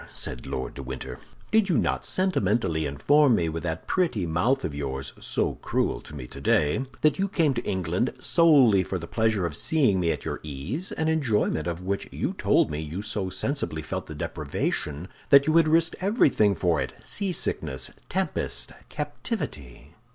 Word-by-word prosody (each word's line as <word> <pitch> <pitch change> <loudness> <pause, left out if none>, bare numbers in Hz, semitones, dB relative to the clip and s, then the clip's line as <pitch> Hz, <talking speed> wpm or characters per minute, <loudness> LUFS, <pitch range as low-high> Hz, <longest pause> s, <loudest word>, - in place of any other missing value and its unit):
said - - -4
Lord 65 - -4
de - - -7
Winter. 65 -1 -6 0.3
"Did 220 -2 +3
not 175 - +1
you - - -8
sentimentally 100 - +1
inform 130 - +4
me 85 -4 +1
with 80 +1 -4
that 80 -2 -4
pretty 160 - 0
mouth 100 +12 +1
of 75 - -3
yours, 70 -2 -4
so - - -1
cruel - - 0
to 75 - -11
me 65 -4 -6
today, 75 - +1 0.2
that 155 +4 +3
you 195 - +2
came 165 -7 +2
to 120 - -3
England 95 +5 0
solely 140 - +5
for 95 +1 -3
the 85 - -6
pleasure 110 -2 +1
of 80 -3 -3
seeing 130 - +2
me 85 -2 +2
at 75 - -4
your - - -3
ease, 80 - -5
an 160 - -1
enjoyment 120 - +1
of 85 +1 -3
which 100 +2 -2
you - - -2
told - - +2
me 75 - -3
you 80 +6 -5
so 105 -3 -2
sensibly 95 - -2
felt - - -4
the - - -7
deprivation 75 +4 -3 0.2
that 140 0 +7
you 155 +1 +2
had 165 -2 +6
risked 165 +1 +3
everything 145 - +3
for 85 -3 +1
it—seasickness, 80 - -2 0.2
tempest, - - -1 0.2
captivity? 65 -4 -5
95 Hz, 175 wpm, -26 LUFS, -, 0.3 s, that